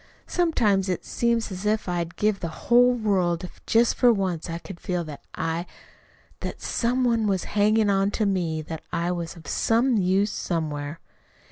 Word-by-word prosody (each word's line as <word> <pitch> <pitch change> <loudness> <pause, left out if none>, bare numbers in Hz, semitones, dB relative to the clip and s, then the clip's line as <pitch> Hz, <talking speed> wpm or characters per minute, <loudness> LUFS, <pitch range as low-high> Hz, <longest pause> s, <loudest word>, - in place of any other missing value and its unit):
sometimes 215 - +1
it 180 - -2
seems 235 -2 0
as 185 +1 -6
if 215 0 0
I'd 175 -1 -2
give 210 -1 +1
the 170 - -3
whole 240 +9 +4
world 190 -7 +1
if 180 - -10
just 230 +1 +4
for 245 -2 +5
once 185 -6 -1
I 165 - -3
could 175 +1 -10
feel 180 -2 -2
that 150 -3 -9
I 165 +2 -2 0.7
that - - -5
some 250 +2 0
one 230 -3 +2
was 190 -3 0
hanging 210 0 +3
on 195 0 +2
to 215 - +1
me! 170 -5 0
that 160 +1 -6
I 170 +1 0
was 170 -2 -4
of 165 - -14
some 235 +2 +2
use 195 +2 +2
somewhere." 155 -2 -3
195 Hz, 175 wpm, -25 LUFS, 170-225 Hz, 0.7 s, for